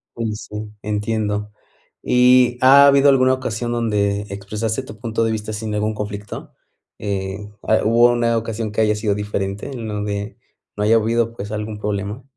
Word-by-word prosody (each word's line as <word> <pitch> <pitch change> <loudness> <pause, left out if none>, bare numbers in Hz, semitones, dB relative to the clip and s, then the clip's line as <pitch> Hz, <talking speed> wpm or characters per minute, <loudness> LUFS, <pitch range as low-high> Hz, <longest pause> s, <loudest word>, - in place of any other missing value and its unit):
Uy, 115 -2 -2
sí, 105 0 -7
entiendo. 105 0 -2 0.5
¿Y 125 0 +4
ha 140 +2 +8
habido 140 0 +5
alguna 130 -1 +4
ocasión 120 -2 -3
donde 105 -4 0
expresaste 105 +5 -3
tu 110 -5 -11
punto 115 0 -1
de 115 - +1
vista 110 0 -4
sin 105 0 -4
ningún 105 +1 -1
conflicto?, 105 -1 -6 0.5
eh, 95 -1 -2 0.3
a 110 - +2
¿hubo 120 +2 +5
una 120 -1 +1
ocasión 115 -1 -3
que 105 - 0
haya 105 -1 +3
sido 105 -1 0
diferente 105 +3 -3
en 120 -4 -6
donde 105 0 -4 0.4
no 105 - -2
haya 110 +2 +5
habido, 115 +1 0
pues, 105 -2 -7
algún 105 0 -4
problema? 105 +3 -3
110 Hz, 165 wpm, -20 LUFS, 105-115 Hz, 0.5 s, ha